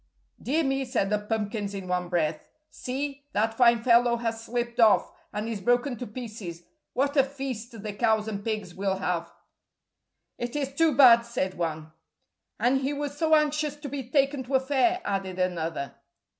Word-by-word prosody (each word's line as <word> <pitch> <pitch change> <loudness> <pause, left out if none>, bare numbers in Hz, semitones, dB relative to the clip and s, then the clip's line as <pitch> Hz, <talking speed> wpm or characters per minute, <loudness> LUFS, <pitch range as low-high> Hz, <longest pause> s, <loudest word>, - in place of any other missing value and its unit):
"Dear 310 +6 +1
me," 270 -1 0
said 240 -6 -1
the 210 - +2
pumpkins 210 -1 -3
in 190 -2 -6
one 180 -1 -1
breath; 160 -3 -1 0.2
"see, 280 +2 -5
that 220 +2 +1
fine 235 -1 +4
fellow 240 -1 +4
has 225 -1 -3
slipped 240 +1 -3
off, 220 -3 +5 0.2
and 210 +1 -3
is 220 -4 -4
broken 245 +5 +2
to 245 - -6
pieces. 210 -7 -7 0.3
What 275 +3 0
a 275 - +6
feast 255 -5 -6
the 210 -1 -4
cows 220 0 +1
and 205 -2 -4
pigs 210 -5 -3
will 195 +1 -1
have." 170 -3 -2 1.1
"It 240 +2 -4
is 275 -2 -2
too 315 -1 +3
bad," 245 -4 +8
said 210 -5 -2
one. 160 -2 -4 0.7
"And 250 +4 +2
he 275 +2 -1
was 285 0 -4
so 315 +1 +3
anxious 300 -1 +1
to 295 -1 -8
be 265 -3 -5
taken 275 0 +2
to 265 +2 -1
a - - +6
fair," 290 +7 +1
added 195 -2 -2
another. 165 -6 -2
235 Hz, 175 wpm, -27 LUFS, 200-270 Hz, 1.1 s, bad